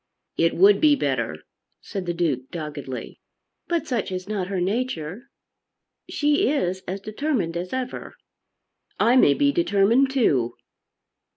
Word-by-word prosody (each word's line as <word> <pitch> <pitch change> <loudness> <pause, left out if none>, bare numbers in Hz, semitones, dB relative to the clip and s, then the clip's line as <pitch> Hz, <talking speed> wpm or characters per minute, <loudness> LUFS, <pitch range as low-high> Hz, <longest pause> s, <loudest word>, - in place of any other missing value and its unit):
"It 165 0 +2
would 200 +3 +5
be 300 -2 +6
better," 280 - -2 0.4
said 195 -4 -6
the 175 - 0
Duke 140 -7 -1
doggedly. 150 -5 -6 0.5
"But 340 -1 -1
such 235 -8 -2
is 185 0 -5
not 200 -4 -2
her 195 -1 -2
nature. 200 - -3 0.8
She 295 -2 +2
is 190 -10 -1
as 190 +2 -3
determined 215 - -2
as 180 +2 -4
ever." 260 -1 -5 0.8
"I 240 - +4
may 145 - +5
be 285 0 +3
determined 250 - +3
too." 140 - +1
195 Hz, 130 wpm, -24 LUFS, 170-260 Hz, 0.8 s, be